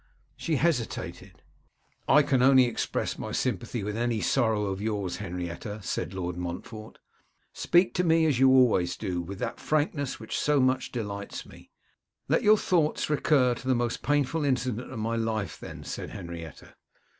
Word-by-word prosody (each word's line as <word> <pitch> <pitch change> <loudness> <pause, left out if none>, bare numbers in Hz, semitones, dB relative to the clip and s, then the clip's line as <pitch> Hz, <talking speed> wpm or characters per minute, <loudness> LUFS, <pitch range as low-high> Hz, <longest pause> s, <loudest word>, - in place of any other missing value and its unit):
She 160 - -1
hesitated. 145 -6 -2 0.6
'I 150 +1 +6
can 130 -2 +2
only 130 0 +6
express 120 - -2
my - - -5
sympathy 115 - -2
with 105 +1 -3
any 120 -1 0
sorrow 110 -4 +1
of 95 0 -3
yours, 105 -5 -2
Henrietta,' 90 +2 -5
said 90 - -3
Lord 90 -2 -3
Montfort. 90 +5 -7 0.6
'Speak 175 +1 +3
to 180 - +1
me 165 -1 +4
as 145 -6 +2
you 135 0 +6
always 120 -10 +4
do, 90 -5 -2
with 95 +3 -7
that 120 +1 -4
frankness 145 -3 -1
which 110 - -4
so 150 -1 +2
much 130 0 +1
delights 100 -4 -5
me.' - - -15 0.6
'Let - - +2
your 215 +1 +6
thoughts 160 -6 +1
recur 140 -4 +3
to 125 +2 -9
the 130 - +3
most 120 -1 -1
painful 145 +3 +1
incident 125 -3 -1
of 130 - -6
my 115 +1 -1
life, 110 -4 -2
then,' - - -9
said - - -5
Henrietta. 85 -3 -9
120 Hz, 165 wpm, -27 LUFS, 100-140 Hz, 0.6 s, I